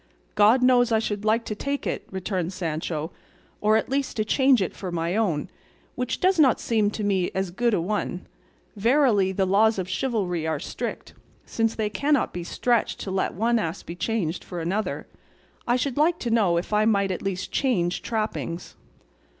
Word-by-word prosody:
"God 225 +5 +5
knows 245 -2 +4
I 225 - +4
should 210 -2 -2
like 225 +2 +2
to - - -3
take 280 +6 -3
it," - - -3
returned 190 -1 -3
Sancho, 160 -2 -3 0.5
"or 215 +1 +4
at 220 - -1
least 275 -1 -2
to 215 - +1
change 265 +2 +4
it 190 - -2
for 185 -2 -5
my 170 +1 -1
own, 190 -8 0 0.5
which 250 0 -3
does 370 -1 +2
not 270 -6 +5
seem 215 -3 +1
to 210 0 -5
me 190 -3 +1
as 190 -2 -1
good 235 +4 +1
a - - +1
one: 185 0 -2 0.5
verily 225 -3 +3
the 190 0 +1
laws 215 +3 +3
of 185 -2 -2
chivalry 185 -7 -1
are 160 -2 -1
strict, - - -5 0.3
since 225 -1 0
they 215 -1 -1
cannot 285 +4 +1
be 175 - -4
stretched 235 +6 0
to 190 - -4
let 190 - -1
one 230 +4 +2
ass 170 -3 -3
be 170 - -7
changed 180 -4 -2
for 175 - -6
another; 190 +6 -2 0.6
I 240 - +3
should 255 +1 -1
like 325 +3 +3
to 235 - -2
know 200 -7 +3
if 175 +5 -3
I 210 +1 +3
might 200 -3 +2
at 180 - -3
least 190 -1 -3
change 180 -10 0
trappings." 215 -6 -3
210 Hz, 190 wpm, -25 LUFS, 180-235 Hz, 0.6 s, God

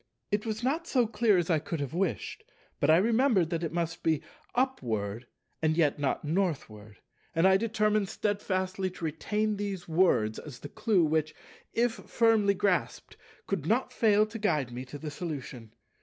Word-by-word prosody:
It 205 +2 0
was 220 +1 -3
not 315 +7 0
so 250 -6 +3
clear 215 -2 +2
as 175 0 0
I 160 - +3
could 160 +2 -4
have 140 -1 -4
wished; 170 - -2 0.4
but 145 - +2
I 160 - +7
remembered 225 - +3
that 170 0 -1
it 165 - -2
must 165 -1 -2
be 160 -2 +1 0.3
"Upward, 120 - -1 0.3
and 155 0 +1
yet 150 -3 +2
not 145 +1 -1
Northward," 140 - -2 0.4
and 165 +3 +5
I 190 - +6
determined 215 -1 +1
steadfastly 190 -2 -1
to 180 -2 -7
retain 210 +7 -1
these 195 -3 -4
words 160 -11 +2
as 140 -5 -9
the 145 - -7
clue 190 -3 +2
which, 155 0 0 0.4
if 240 +1 +3
firmly 225 -5 +2
grasped, 190 -1 -1 0.3
could 175 -7 -2
not 250 +4 +1
fail 215 -3 +4
to 225 +1 -8
guide 150 - 0
me 125 +2 -6
to 130 +3 -8
the 150 +1 -6
solution. 135 -8 -6
180 Hz, 170 wpm, -29 LUFS, 150-215 Hz, 0.4 s, I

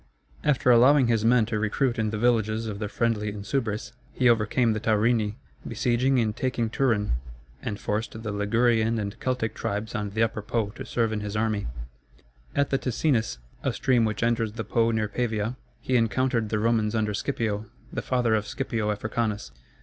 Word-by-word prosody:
] - - -28
After 125 -1 +2
allowing 130 +3 +6
his 115 -2 +2
men 115 0 +4
to 110 -1 -2
recruit 115 +3 0
in 110 -1 +1
the 105 - -3
villages 110 -1 +1
of 105 -2 -5
the 105 - -2
friendly 110 -2 0
Insubres, 105 +2 -3 0.2
he 125 -1 +3
overcame 115 +1 +3
the 110 - -2
Taurini, 110 0 +2 0.3
besieging 125 +1 +1
and 110 -2 0
taking 120 -3 -1
Turin, 110 - +1 0.4
and 105 - -4
forced 110 +2 -3
the 110 - -3
Ligurian 115 +2 +2
and 105 +1 -4
Celtic 125 -4 -1
tribes 105 +1 -3
on 105 -1 -2
the 110 +3 +1
Upper 110 -1 -1
Po 110 0 -1
to 115 - -9
serve 115 -2 0
in 105 - -1
his 105 0 -5
army. 105 -2 0 0.9
At 140 -1 +1
the 135 - +2
Ticinus, 120 - 0 0.2
a - - 0
stream 125 -3 +2
which 110 -1 -1
enters 115 -2 +1
the 115 0 -4
Po 115 0 +2
near 110 -2 0
Pavia, 115 0 -1 0.3
he 130 - 0
encountered 115 0 +1
the 110 - 0
Romans 110 0 +1
under 105 -1 0
Scipio, 110 -3 -2 0.3
the - - -2
father 125 -3 +1
of 105 -1 0
Scipio 115 -6 -2
Africanus. 105 - -2
110 Hz, 180 wpm, -26 LUFS, 105-120 Hz, 0.9 s, allowing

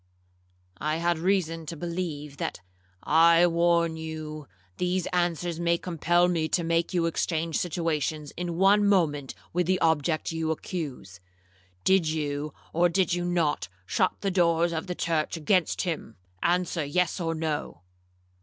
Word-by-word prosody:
'—'I 155 +1 -1
had 170 0 0
reason 165 -3 0
to 165 - -5
believe 165 -4 -4
that—' - - -4 0.4
'I 165 +2 +6
warn 170 -1 +2
you, 155 -2 -6 0.3
these 180 0 0
answers 175 -1 0
may 170 0 +2
compel 175 0 +2
me 165 -3 0
to 175 - +1
make 165 0 +1
you 175 -3 +1
exchange 165 -1 -1
situations 155 -3 -2
in 175 -1 -3
one 200 +3 +5
moment 160 -9 +1 0.2
with 175 0 +1
the 185 0 +2
object 160 0 +1
you 160 -1 -2
accuse. 145 - -5 0.6
Did 190 -4 +3
you, 150 -1 -2 0.2
or 175 +2 +4
did 185 +1 +1
you 175 0 -1
not 170 - 0 0.2
shut - - +1
the 195 - 0
doors 170 -2 +2
of 160 +3 -3
the 180 - -3
church 165 -1 -1
against 175 +2 +1
him?—answer 160 - -2
yes 175 +6 0
or 165 -2 -1
no.' 155 - -3
165 Hz, 145 wpm, -27 LUFS, 155-175 Hz, 0.6 s, I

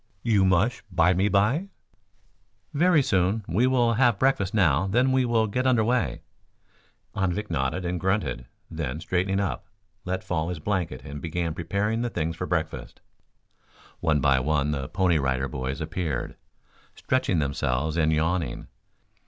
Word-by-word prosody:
"You 105 -5 +3
mush 95 +7 +2
bymeby?" 100 - +2 1.0
"Very 160 0 +4
soon. 95 +1 +1
We 110 +10 +2
will 120 -3 +3
have 120 -2 +3
breakfast 100 -6 +1
now, 95 -5 +2
then 125 +7 +2
we 130 -1 +2
will 115 -2 +2
get 125 +5 -1
under 120 -4 +3
way." 115 - 0 0.9
Anvik 100 +1 -1
nodded 65 +8 -1
and 90 0 -2
grunted, 95 - -1 0.2
then, 75 -3 -4
straightening 95 +3 0
up, 100 -2 -3 0.4
let 95 +1 -3
fall 80 -1 -2
his 90 - -3
blanket 80 -6 -2
and 70 +1 -7
began 85 0 -2
preparing 100 +8 -1
the 120 - -1
things 80 -5 -2
for 90 - -4
breakfast. 80 -2 -3 1.0
One 75 -3 +1
by 70 -2 +4
one 75 +1 0
the 70 -1 -3
Pony 85 -1 +2
Rider 65 0 0
Boys 65 0 -4
appeared, 80 -5 -3 0.6
stretching 130 -8 0
themselves 70 +1 -1
and 80 -2 +2
yawning. 80 +2 -1
90 Hz, 145 wpm, -26 LUFS, 80-105 Hz, 1.0 s, Very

